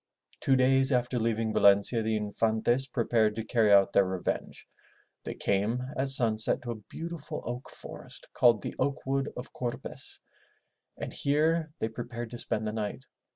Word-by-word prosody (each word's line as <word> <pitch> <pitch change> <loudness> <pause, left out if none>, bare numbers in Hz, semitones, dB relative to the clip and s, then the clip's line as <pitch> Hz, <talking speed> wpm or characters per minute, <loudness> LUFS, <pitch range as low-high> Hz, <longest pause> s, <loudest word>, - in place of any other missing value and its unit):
Two 135 - +2
days 135 +1 +3
after 125 -1 +1
leaving 110 -1 -1
Valencia, 100 +3 +4
the 110 0 0
Infantes 110 +5 +1
prepared 115 -4 +1
to 110 - -3
carry 110 -1 +2
out 100 0 +5
their 100 - +5
revenge. 95 -1 -4 0.6
They - - -5
came 105 +5 0
at 135 +1 -1
sunset 115 -5 +4
to 120 - -4
a 110 -2 -7
beautiful 165 -2 -6
oak 120 +2 -6
forest - - -11
called 120 -4 +4
the - - -4
Oak 140 +1 -1
wood 135 +1 -1
of 125 - -8
Corpes 120 -1 -6 0.8
and - - -6
here 155 +3 +1
they - - -1
prepared 120 0 -7
to 120 - -7
spend 110 -2 -2
the 105 - -3
night. 110 +4 -4
120 Hz, 160 wpm, -29 LUFS, 110-130 Hz, 0.8 s, out